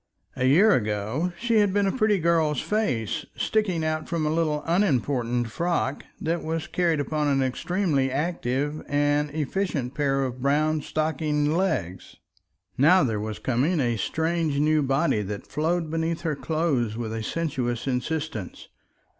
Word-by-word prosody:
A 130 Hz, -, 0 dB
year 180 Hz, +12 st, +6 dB
ago 110 Hz, -, -1 dB
she 235 Hz, -1 st, +1 dB
had 205 Hz, -2 st, +3 dB
been 205 Hz, -1 st, +3 dB
a 195 Hz, -, +2 dB
pretty 215 Hz, -4 st, +3 dB
girl's 160 Hz, -4 st, +2 dB
face 130 Hz, -, -1 dB
sticking 185 Hz, -7 st, 0 dB
out 155 Hz, 0 st, -2 dB
from 165 Hz, -2 st, -1 dB
a 150 Hz, -, +1 dB
little 155 Hz, -2 st, 0 dB
unimportant 125 Hz, -, +1 dB
frock 170 Hz, -3 st, -1 dB, 0.2 s
that 165 Hz, +1 st, -1 dB
was 160 Hz, 0 st, -2 dB
carried 170 Hz, -4 st, 0 dB
upon 150 Hz, +1 st, -1 dB
an 135 Hz, -2 st, +2 dB
extremely 150 Hz, 0 st, 0 dB
active 145 Hz, -1 st, -1 dB
and 145 Hz, +1 st, +1 dB
efficient 150 Hz, -3 st, -2 dB
pair 135 Hz, -2 st, +1 dB
of 130 Hz, -1 st, -4 dB
brown 150 Hz, +3 st, +2 dB
stockinged 155 Hz, -1 st, 0 dB
legs. 155 Hz, -, -2 dB, 0.6 s
Now 180 Hz, +7 st, +6 dB
there 110 Hz, -5 st, 0 dB
was 110 Hz, 0 st, -4 dB
coming 135 Hz, +8 st, 0 dB
a 120 Hz, -4 st, +1 dB
strange 160 Hz, -, -1 dB
new 155 Hz, +1 st, +3 dB
body 135 Hz, -3 st, +1 dB
that 100 Hz, 0 st, -5 dB
flowed 160 Hz, +2 st, -1 dB
beneath 165 Hz, 0 st, -1 dB
her 160 Hz, -3 st, -1 dB
clothes 140 Hz, -9 st, -1 dB
with 110 Hz, -2 st, -4 dB
a 115 Hz, -, -3 dB
sinuous 125 Hz, -4 st, -2 dB
insistence. 135 Hz, -, -3 dB
150 Hz, 150 wpm, -25 LUFS, 130-165 Hz, 0.6 s, year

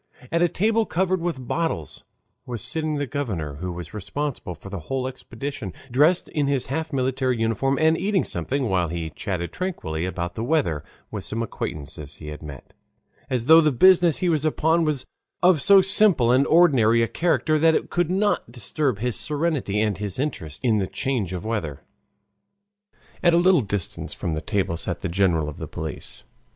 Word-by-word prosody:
At 170 Hz, -, +1 dB
a 175 Hz, -, +5 dB
table 220 Hz, +6 st, +1 dB
covered 185 Hz, +1 st, 0 dB
with 160 Hz, -8 st, -3 dB
bottles 165 Hz, -, -3 dB, 0.4 s
was 120 Hz, -5 st, -2 dB
sitting 155 Hz, -1 st, 0 dB
the 145 Hz, 0 st, -1 dB
governor, 105 Hz, -, -4 dB
who 90 Hz, +3 st, -4 dB
was 85 Hz, 0 st, -8 dB
responsible 115 Hz, -, -4 dB
for 100 Hz, +5 st, -12 dB
the 100 Hz, -, -4 dB
whole 130 Hz, +10 st, -3 dB
expedition, 130 Hz, -4 st, -6 dB, 0.2 s
dressed 150 Hz, +8 st, +3 dB
in 145 Hz, -2 st, 0 dB
his 140 Hz, -2 st, +1 dB
half 160 Hz, +1 st, -3 dB
military 130 Hz, -2 st, 0 dB
uniform 115 Hz, +5 st, +1 dB
and 160 Hz, 0 st, +4 dB
eating 195 Hz, +1 st, +1 dB
something 130 Hz, +10 st, -2 dB
while 90 Hz, -4 st, +1 dB
he 80 Hz, -1 st, -4 dB
chatted 90 Hz, 0 st, -4 dB
tranquilly 90 Hz, -, -3 dB
about 90 Hz, -1 st, -4 dB
the 110 Hz, -, -4 dB
weather 120 Hz, -, 0 dB, 0.3 s
with -, -, -5 dB
some 115 Hz, +1 st, -3 dB
acquaintances 75 Hz, -8 st, -6 dB
he 75 Hz, -, -9 dB
had 75 Hz, -, -8 dB
met, 70 Hz, -3 st, -10 dB, 0.6 s
as 125 Hz, -3 st, -1 dB
though 160 Hz, +4 st, +8 dB
the 155 Hz, -1 st, +3 dB
business 175 Hz, +3 st, +5 dB
he 180 Hz, -, 0 dB
was 155 Hz, -4 st, +1 dB
upon 160 Hz, +2 st, +2 dB
was 150 Hz, -4 st, -1 dB, 0.4 s
of 180 Hz, -5 st, +5 dB
so 195 Hz, +2 st, +7 dB
simple 185 Hz, -, +5 dB
and 130 Hz, +3 st, +4 dB
ordinary 125 Hz, -9 st, +5 dB
a -, -, +1 dB
character 155 Hz, -1 st, +1 dB
that 160 Hz, +1 st, +4 dB
it -, -, -2 dB
could 175 Hz, -2 st, +1 dB
not 195 Hz, -, 0 dB
disturb 125 Hz, +2 st, -1 dB
his 120 Hz, +2 st, -2 dB
serenity 150 Hz, -9 st, -1 dB
and 105 Hz, -3 st, 0 dB
his 100 Hz, -3 st, -4 dB
interest 105 Hz, -, -4 dB
in 110 Hz, -4 st, +3 dB
the 95 Hz, -, -1 dB
change 125 Hz, -, -2 dB
of 90 Hz, +2 st, -5 dB
weather. 90 Hz, -12 st, -3 dB, 1.4 s
At 170 Hz, -1 st, +4 dB
a -, -, +5 dB
little 180 Hz, -2 st, +5 dB
distance 100 Hz, -4 st, -5 dB
from 85 Hz, -, -3 dB
the 80 Hz, -, -3 dB
table 95 Hz, -1 st, -1 dB
sat 90 Hz, +1 st, -3 dB
the 100 Hz, -, -2 dB
general 85 Hz, -4 st, +1 dB
of 75 Hz, -, -7 dB
the -, -, -6 dB
police. -, -, -7 dB
130 Hz, 185 wpm, -24 LUFS, -, 1.4 s, though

